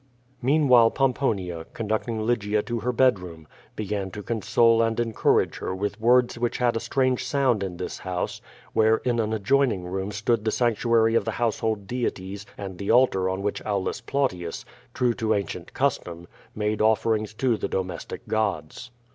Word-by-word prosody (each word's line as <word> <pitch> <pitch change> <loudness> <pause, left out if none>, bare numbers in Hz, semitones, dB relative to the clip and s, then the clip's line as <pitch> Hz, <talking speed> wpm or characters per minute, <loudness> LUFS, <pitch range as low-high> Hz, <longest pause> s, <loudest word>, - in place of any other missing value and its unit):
Meanwliilc, 125 -4 +5
Pomponia, 100 -11 0
conducting 110 0 -2
Lygia 105 -3 +1
to 120 -1 -3
her 125 +3 -1
bed 125 -4 +3
room, 85 -4 -10 0.3
began 100 -2 -3
to 105 +2 -8
console 115 +2 +3
and 115 0 0
encourage 115 -3 +1
her 95 - -3
with 100 +2 -3
words 120 +1 +3
which 120 0 -1
had 120 -2 +1
a - - 0
strange 130 +2 0
sound 130 -7 +1
in 95 -3 -4
this 90 - -5
house, 90 -1 -4 0.3
where 110 0 +4
in 120 -2 +1
an 110 -1 0
adjoining 115 -1 +1
room 95 +2 -3
stood 105 +2 0
the 110 - +1
sanctuary 115 -1 +2
of 115 - +3
the 110 - -3
household 110 -3 -1
deities 100 -4 -4
and 95 -3 -7
the 100 - -4
altar 115 -6 +4
on 95 +1 -3
wJiich 105 - -2
Aulus 100 -3 -2
Plautius, 90 -12 -2 0.3
true 125 -1 +2
to 110 -2 0
ancient 95 -3 -4
custom, 85 -11 -1 0.3
made 105 0 -1
offerings 110 -1 +1
to 125 0 +1
the - - -3
domestic 90 -2 -4
gods. 105 -1 -2
110 Hz, 165 wpm, -25 LUFS, 100-120 Hz, 0.3 s, Meanwliilc